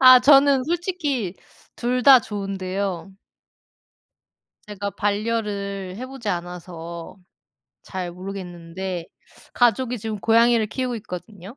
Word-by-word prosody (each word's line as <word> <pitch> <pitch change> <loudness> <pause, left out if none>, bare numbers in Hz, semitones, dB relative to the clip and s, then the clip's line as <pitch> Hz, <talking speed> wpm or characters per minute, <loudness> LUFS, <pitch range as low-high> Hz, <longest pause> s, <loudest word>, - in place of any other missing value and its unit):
아 255 -1 +10
저는 275 0 +6
솔직히 315 - -1 0.4
2 250 +1 0
다 265 0 +9
좋은데요. 195 -2 -4 1.6
제가 200 -1 -4
반려를 200 -3 -2
해 255 - -5
보지 260 -5 -7
않아서 170 -1 -5 0.7
잘 180 -2 -5
모르겠는데 180 -1 -6 0.5
가족이 245 +1 +2
지금 215 -1 -4
고양이를 230 0 +4
키우고 255 +1 -2
있거든요. 205 +1 -9
205 Hz, 230 characters per minute, -23 LUFS, 185-245 Hz, 1.6 s, 아